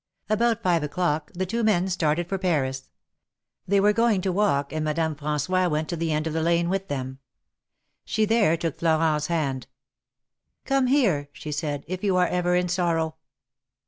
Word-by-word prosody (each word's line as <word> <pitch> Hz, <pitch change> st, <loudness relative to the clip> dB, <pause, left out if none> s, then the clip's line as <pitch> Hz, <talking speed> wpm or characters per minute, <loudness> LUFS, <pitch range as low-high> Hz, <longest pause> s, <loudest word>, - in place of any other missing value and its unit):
About 230 Hz, +1 st, +1 dB
five 175 Hz, -3 st, +2 dB
o'clock 150 Hz, 0 st, -1 dB
the 185 Hz, +1 st, -1 dB
two 230 Hz, +5 st, -2 dB
men 190 Hz, -4 st, +2 dB
started 170 Hz, -2 st, 0 dB
for 195 Hz, +1 st, -2 dB
Paris. 135 Hz, -8 st, -1 dB, 0.8 s
They 200 Hz, +2 st, +3 dB
were 205 Hz, +1 st, +4 dB
going 230 Hz, -3 st, +2 dB
to 190 Hz, -, -1 dB
walk, 165 Hz, -8 st, +1 dB
and 155 Hz, 0 st, -2 dB
Madame 155 Hz, +1 st, 0 dB
Fran9ois 150 Hz, +5 st, 0 dB
went 155 Hz, 0 st, -1 dB
to 175 Hz, -, -2 dB
the 165 Hz, -1 st, -2 dB
end 155 Hz, 0 st, 0 dB
of 160 Hz, -, -2 dB
the 160 Hz, -, 0 dB
lane 170 Hz, +1 st, +2 dB
with 195 Hz, +1 st, -2 dB
them. 130 Hz, -1 st, -4 dB, 0.8 s
She 220 Hz, -1 st, 0 dB
there 210 Hz, -7 st, +3 dB
took 165 Hz, -3 st, -3 dB
Florent's 160 Hz, -2 st, +2 dB
hand. 140 Hz, -7 st, -2 dB, 1.0 s
Come 270 Hz, -1 st, +2 dB
here," 200 Hz, -, +2 dB
she 150 Hz, -, -7 dB
said, 145 Hz, -1 st, -3 dB
if 185 Hz, +2 st, -5 dB
you 195 Hz, -3 st, +2 dB
are 180 Hz, -1 st, +3 dB
ever 180 Hz, 0 st, +1 dB
in 180 Hz, 0 st, +1 dB
sorrow." 165 Hz, -3 st, 0 dB
170 Hz, 175 wpm, -25 LUFS, 150-190 Hz, 1.0 s, were